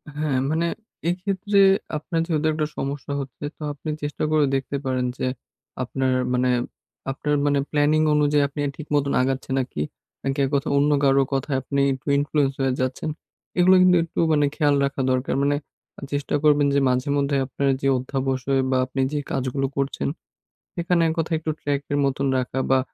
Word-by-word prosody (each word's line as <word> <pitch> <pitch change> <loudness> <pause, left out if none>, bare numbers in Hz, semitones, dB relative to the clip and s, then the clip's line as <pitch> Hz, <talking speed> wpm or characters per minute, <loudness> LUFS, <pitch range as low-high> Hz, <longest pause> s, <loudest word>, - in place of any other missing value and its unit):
হ্যাঁ, 150 -3 0
মানে 165 +2 +1 0.4
এক্ষেত্রে 195 +3 0 0.4
আপনার 165 +2 -3
যেহেতু 155 -2 +1
একটা 155 -1 -1
সমস্যা 140 +1 -3
হচ্ছে 135 +1 -9
তো - - -21
আপনি 150 +2 -7
চেষ্টা 145 0 -3
করে 155 -1 +4
দেখতে 135 +1 -2
পারেন 130 -1 0
যে - - -2 0.6
আপনার 130 +1 -1 0.2
মানে 125 0 +2 0.6
আপনার 150 +2 -1
মানে 145 -1 +2
প্ল্যানিং 150 +1 +3
অনুযায়ী 145 -1 +3
আপনি 140 +2 -9 0.2
ঠিক 155 - -8
মত 145 - +3 0.2
আগাচ্ছেন 130 0 -2
নাকি, 125 - -3 0.4
নাকি 135 +1 -1 0.4
অন্য 145 +1 +3
কারো 135 0 +5
কথায় 135 0 0
আপনি 140 +1 -1
একটু 130 +2 -10
ইনফ্লুয়েন্স 145 -1 +1
হয়ে 135 -1 +2
যাচ্ছেন। 130 +4 -2 0.5
এগুলো 185 +1 +6
কিন্তু 180 -1 +6
একটু 165 - -6
মানে 145 -1 +3
খেয়াল 145 -3 +3
রাখা 140 0 -2
দরকার। 130 +1 0
মানে 145 +1 +2 0.6
চেষ্টা 145 0 -1
করবেন 145 -1 +4
যে - - +5
মাঝে 125 +2 0
মধ্যে 140 0 +1
আপনার 140 +2 -2
যে 135 - +1
অধ্যাবসয় 135 +1 -1
বা 130 - +3
আপনি 135 - -3
যে 150 - 0
কাজগুলো 135 0 -1
করছেন 140 0 -1 0.7
সেখানে 175 0 +1
এক 160 - 0
কথায় 165 0 0
একটু 155 0 -2
ট্র্যাক 140 -1 -1
এর 145 - +1
মতন 135 0 0
রাখা 130 +1 -2
বা 135 - +5
140 Hz, 170 wpm, -23 LUFS, 135-150 Hz, 0.7 s, এগুলো